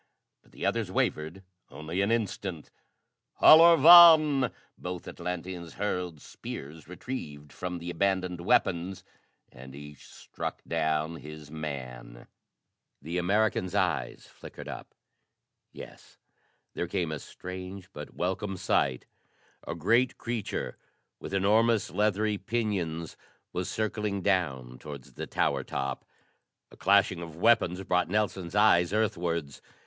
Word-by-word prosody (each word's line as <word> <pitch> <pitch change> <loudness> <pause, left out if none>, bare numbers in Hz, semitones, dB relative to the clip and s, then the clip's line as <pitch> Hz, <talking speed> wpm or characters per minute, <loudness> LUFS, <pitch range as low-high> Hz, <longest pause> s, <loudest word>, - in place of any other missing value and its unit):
But - - -26
the - - -6
others - - 0
wavered 80 +5 -2 0.3
only 80 +5 -4
an 100 - +1
instant. 100 -7 -3 0.7
"Halor 165 +1 +9
vàn!" 155 -5 +8 0.2
Both 90 -1 -7
Atlanteans 90 -1 -6
hurled 90 -5 -3
spears 75 +2 -9
retrieved 75 - -7
from 90 -1 -5
the 85 +1 -6
abandoned 90 -1 -1
weapons 90 +1 +1 0.5
and 65 +2 -12
each 75 0 -12
struck - - -7
down 80 0 -1
his 75 -1 -11
man. 65 -6 -7 0.7
The 85 +5 -3
American's 95 0 0
eye - - 0
flickered - - -12
up. - - -9 0.8
Yes, - - -13 0.6
there 85 - -3
came 85 -4 -2
a 75 - -4
strange, 90 +3 -8
but 75 0 -9
welcome 95 +2 -2
sight: 65 -6 0 0.6
a 85 - -3
great 115 +9 +2
creature 115 -3 -4 0.4
with - - -8
enormous, 105 +3 +2
leathery 105 0 0
pinions 95 -7 -2 0.4
was 90 0 -3
circling 105 -2 -2
down 65 -10 -1
towards 70 -3 -10
the - - -6
tower - - 0
top! 65 0 -4 0.7
A - - -14
clashing 100 -3 +3
of 85 -2 -8
weapons 95 -2 +2
brought 90 -2 +1
Nelson's 100 -3 -1
eyes 90 -5 +4
earthwards. 85 -9 -1
90 Hz, 120 wpm, -28 LUFS, 80-105 Hz, 0.8 s, Halor